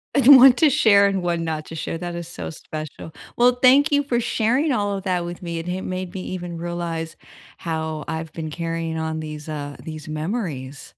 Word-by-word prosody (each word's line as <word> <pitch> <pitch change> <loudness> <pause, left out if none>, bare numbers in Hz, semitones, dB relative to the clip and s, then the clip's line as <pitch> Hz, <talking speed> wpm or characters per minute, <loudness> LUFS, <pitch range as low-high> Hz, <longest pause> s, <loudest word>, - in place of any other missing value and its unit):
And 275 0 +9
one 260 0 +9
to 310 +2 +4
share 200 -5 +5
and 195 -2 -1
one 170 -1 -1
not 155 -1 -3
to 165 - -8
share, 165 - -4
that 175 0 -5
is 170 -1 -6
so 170 - -7
special. 155 0 -8 0.2
Well, 245 +1 +5
thank 280 +4 +6
you 285 0 +3
for 240 -4 0
sharing 250 +7 +1
all 205 -4 0
of 195 - -5
that 180 -2 0
with 175 +1 -7
me. 170 -1 -4
It 165 +2 -5
ha 185 +1 -2
made 185 -1 -5
me 190 - -5
even 175 -2 -6
realize 170 -2 -4 0.4
how 160 -2 -4
I've 160 -1 -4
been 155 -2 -6
carrying 165 0 -3
on 160 0 -3
these, 155 0 -7
uh 145 -2 -5
these 155 -1 -8
memories. 155 - -4
170 Hz, 210 wpm, -22 LUFS, 160-200 Hz, 0.4 s, And